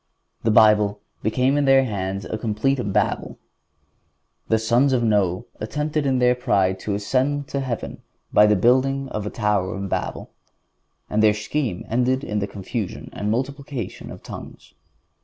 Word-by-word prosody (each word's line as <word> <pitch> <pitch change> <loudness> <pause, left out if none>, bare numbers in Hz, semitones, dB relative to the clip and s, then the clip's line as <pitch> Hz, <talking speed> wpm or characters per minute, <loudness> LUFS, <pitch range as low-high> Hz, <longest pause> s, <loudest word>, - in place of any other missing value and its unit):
The 115 - +1
Bible 105 -1 +5 0.2
became 130 +6 +1
in 145 - +2
their 135 0 +6
hands 100 -3 -3
a - - -4
complete 110 +5 0
Babel. - - -1 1.1
The 110 - +3
sons 120 +5 +2
of 120 -2 +2
Noe 100 -5 +1
attempted 150 +6 -2
in 130 -1 +2
their 125 0 +4
pride 95 -6 +1
to 100 0 -2
ascend 135 +7 0
to 140 - -2
heaven 130 -4 -4 0.3
by 105 0 +7
building 130 +6 +2
the 105 -1 -3
tower 105 -4 0
of 100 0 -4
Babel, - - -3 0.8
and 105 - 0
their 105 -1 +5
scheme 110 -2 -3
ended 125 +3 +1
in 105 -5 -2
the 100 - -2
confusion 100 +1 -5
and 105 - -3
multiplication 135 -1 -4
of - - -10
tongues. - - -10
110 Hz, 150 wpm, -23 LUFS, 105-135 Hz, 1.1 s, by